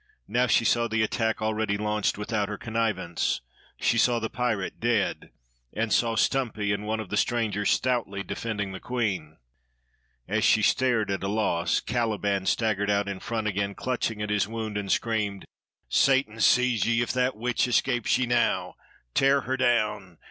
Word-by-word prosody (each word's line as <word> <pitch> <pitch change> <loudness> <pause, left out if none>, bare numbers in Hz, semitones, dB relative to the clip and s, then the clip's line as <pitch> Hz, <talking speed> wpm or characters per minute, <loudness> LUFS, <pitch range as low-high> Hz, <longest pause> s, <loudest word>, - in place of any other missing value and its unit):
Now 125 +1 +1
she 115 - +3
saw 120 0 +2
the 110 -1 +1
attack 110 0 -1
already 110 -1 0
launched 105 -1 0
without 105 -1 -2
her 105 - -4
connivance; 110 - -1 0.4
she 115 - +2
saw 120 0 +3
the 110 -1 -3
pirate, 115 -6 -2
dead, 115 -3 0 0.4
and 115 0 -1
saw 115 -1 +2
Stumpy 110 -6 0
and 100 +1 -4
one 110 0 -1
of 110 - -6
the - - -2
strangers 105 -4 0
stoutly 120 -6 0
defending 105 -1 -4
the 95 - -7
queen. 95 -11 -3 0.9
As - - 0
she - - +4
stared, 120 -6 +2
at 95 - -2
a 95 - -2
loss, 95 -5 0
Caliban 105 -4 -1
staggered 105 -3 +1
out 100 0 +1
in 100 -1 -4
front 110 0 -3
again, 100 -1 -1
clutching 115 -4 -2
at 105 - -3
his 105 -1 +1
wound, 110 -1 -5
and 100 -1 -2
screamed: 105 -4 -1 0.4
"Satan 130 -5 +2
seize 125 +1 +3
ye 115 0 +2
if - - -3
that 125 -2 0
witch 125 +2 0
escapes 120 -1 +1
ye 130 - +1
now! 120 0 +1 0.4
Tear 135 +1 +4
her 130 +3 -2
down! 110 -8 0
110 Hz, 170 wpm, -26 LUFS, 100-120 Hz, 0.9 s, she